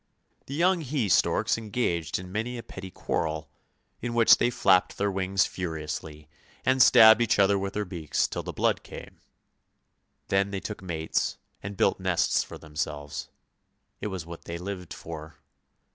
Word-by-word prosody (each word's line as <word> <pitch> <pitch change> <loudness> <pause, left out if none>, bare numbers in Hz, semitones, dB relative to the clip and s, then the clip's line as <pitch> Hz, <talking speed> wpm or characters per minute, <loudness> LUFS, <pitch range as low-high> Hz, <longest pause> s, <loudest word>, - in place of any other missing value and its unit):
The 140 - -5
young 180 +2 +3
he 135 -6 -1
storks 105 - +2
engaged 100 -8 -1
in 90 0 -9
many 115 +5 -3
a 115 - -7
petty 95 0 -9
quarrel, 80 -3 -3 0.5
in 120 0 -3
which 115 -1 +7
they 120 - +2 0.2
napped 95 -1 +4
their 100 0 0
wings 95 0 +1
furiously 75 -3 -5 0.4
and 130 0 +3
stabbed 110 -2 +8
each 120 - +2
other 100 0 +4
with 100 0 -4
their 105 0 -1
beaks 85 -5 -1
till - - -4
the - - -6
blood - - +1
came. - - -11 1.1
Then 100 +1 +2
they 100 -1 -3
took 105 +1 -7
mates 80 -4 -2 0.2
and 100 0 -7
built - - +2
nests - - +1
for - - -10
them 75 -2 -15
selves; 75 -2 -4 0.7
it - - -3
was 95 -5 -5
what 85 0 -10
they 85 - -5
lived 90 -1 -6
for. 80 -1 -8
95 Hz, 165 wpm, -27 LUFS, 80-110 Hz, 1.1 s, stabbed